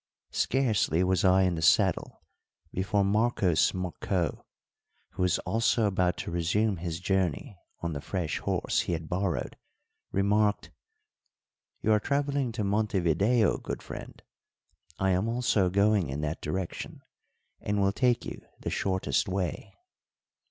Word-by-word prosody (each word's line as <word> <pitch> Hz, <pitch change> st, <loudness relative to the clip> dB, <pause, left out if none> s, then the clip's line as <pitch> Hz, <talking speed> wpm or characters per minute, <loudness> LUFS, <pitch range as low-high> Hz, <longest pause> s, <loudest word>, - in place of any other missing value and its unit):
Scarcely 110 Hz, -, +1 dB
was 95 Hz, 0 st, +1 dB
I 95 Hz, 0 st, +5 dB
in 90 Hz, -1 st, +2 dB
the 80 Hz, -, -3 dB
saddle -, -, +2 dB, 0.5 s
before 100 Hz, +2 st, 0 dB
Marcos 100 Hz, -4 st, +2 dB
Marcó, 90 Hz, -1 st, -2 dB, 0.7 s
who -, -, -6 dB
was 90 Hz, 0 st, +3 dB
also 115 Hz, 0 st, +1 dB
about 90 Hz, -3 st, +1 dB
to -, -, -5 dB
resume 90 Hz, +5 st, +1 dB
his 85 Hz, -1 st, -4 dB
journey 95 Hz, -, -1 dB, 0.2 s
on 85 Hz, -1 st, -2 dB
the 70 Hz, -, -4 dB
fresh 90 Hz, -3 st, -2 dB
horse -, -, 0 dB
he -, -, -1 dB
had 80 Hz, -1 st, -4 dB
borrowed, 90 Hz, -1 st, -2 dB, 0.5 s
remarked: 105 Hz, +2 st, +1 dB, 1.1 s
"You 110 Hz, -, +3 dB
are 105 Hz, -, +5 dB
travelling 140 Hz, 0 st, 0 dB
to 110 Hz, -2 st, -2 dB
Montevideo, 100 Hz, +2 st, +2 dB
good -, -, -6 dB
friend; -, -, -9 dB, 0.7 s
I 95 Hz, 0 st, +1 dB
am 95 Hz, +4 st, +1 dB
also 115 Hz, -6 st, +2 dB
going 100 Hz, -3 st, +2 dB
in 70 Hz, +3 st, -3 dB
that 75 Hz, +1 st, -3 dB
direction, 90 Hz, +4 st, -5 dB, 0.6 s
and 105 Hz, 0 st, -1 dB
will 100 Hz, 0 st, +3 dB
take 125 Hz, +1 st, +1 dB
you -, -, -7 dB, 0.2 s
the -, -, -4 dB
shortest 95 Hz, 0 st, 0 dB
way." 95 Hz, -2 st, -3 dB
95 Hz, 135 wpm, -28 LUFS, 90-105 Hz, 1.1 s, I